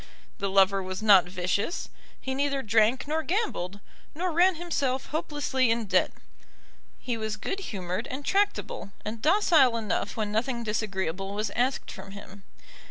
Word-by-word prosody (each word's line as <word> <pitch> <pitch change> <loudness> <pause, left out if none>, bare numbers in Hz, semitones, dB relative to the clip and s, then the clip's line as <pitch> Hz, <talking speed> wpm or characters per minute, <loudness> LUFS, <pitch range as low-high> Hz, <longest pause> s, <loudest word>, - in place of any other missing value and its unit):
The 200 -1 -1
lover 195 0 +4
was 185 +2 -5
not 195 -5 +7
vicious, 185 - -1 0.3
he 265 - -3
neither 275 0 0
drank 220 +5 +2
nor 315 +2 0
gambled, 315 - -2 0.4
nor 360 +3 -1
ran 355 +3 +4
himself 280 -6 -1
hopelessly 290 -5 0
in 230 0 +1
debt. 185 -2 +2 0.9
He 245 -2 -3
was 220 -1 -3
good 390 - -3
humoured 190 - -4
and 275 +2 -6
tractable, 395 - 0
and 215 +1 -5
docile 310 - +4
enough 210 -1 -2
when 210 -2 -1
nothing 235 +2 -1
disagreeable 195 -3 -2
was 210 -1 -2
asked 255 +3 -1
from 195 +1 -10
him. 200 0 -11
225 Hz, 150 wpm, -27 LUFS, 200-285 Hz, 0.9 s, not